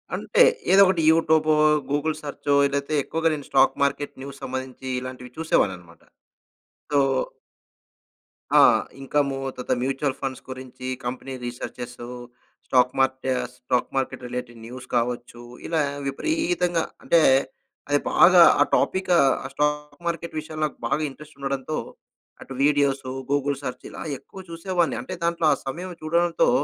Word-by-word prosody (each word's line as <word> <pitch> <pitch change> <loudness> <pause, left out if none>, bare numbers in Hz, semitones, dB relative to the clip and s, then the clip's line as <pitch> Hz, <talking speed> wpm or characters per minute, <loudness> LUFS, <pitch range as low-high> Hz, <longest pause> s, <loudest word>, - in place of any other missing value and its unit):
అంతే - - +3 0.3
ఏదో 195 - +8
ఒకటి 185 -3 +2
యూట్యూబో, 160 -1 +3 0.4
గూగుల్ 150 +2 0
సెర్చో 145 0 -2
ఏదైతే 140 +2 -2
ఎక్కువగా 165 +3 0
నేను 145 -2 -5
స్టాక్ 135 - +4
మార్కెట్ 140 +1 -1
న్యూస్ 140 0 -9
సంబంధించి 130 0 -6
ఇలాంటివి 125 -1 -8
చూసేవాడిననమాట. 95 - -1 0.9
సో 145 - +4 1.6
ఆ! - - +9 0.4
ఇన్కం, 140 +1 0 0.3
తత 125 - -4
మ్యూచుల్ 135 +1 -1
ఫండ్స్ 135 -1 -4
గురించి 130 0 -8 0.2
company 130 +2 -5
researches, 120 0 -7 0.6
stock 125 -1 +3
మార్టే 130 0 +1 0.2
stock 125 0 -1
market 135 -1 -2
related 120 -1 -6
news 125 +2 -9
కావచ్చు. 120 0 -2 0.2
ఇలా 160 -2 +1 0.3
విపరీతంగా 315 - 0 0.2
అంటే 170 - +4 0.7
అది 145 0 +3
బాగా 180 0 +7 0.2
ఆ - - +9
టాపికు 185 -1 +1 0.3
ఆ - - -8
స్టాక్ 150 +1 -2
మార్కెట్ 170 -1 -3
విషయాలు 155 0 -7
నాకు 150 - -6
బాగా - - 0
ఇంట్రెస్ట్ 150 +2 -14
ఉండడంతో, 140 +2 -3 0.6
అటు 135 - -9
వీడియోస్, 140 -2 +2 0.2
గూగుల్ 145 -1 +1
సెర్చ్ 125 -2 -6
ఇలా - - -9 0.2
ఎక్కువ 190 - -14
చూసేవాడిని. 170 -2 -1
అంటే - - -7
దాంట్లో 170 -1 +1
ఆ - - +1
సమయం 175 +7 -5
చూడడంతో 170 +2 +2
140 Hz, 130 wpm, -24 LUFS, 130-160 Hz, 1.6 s, ఆ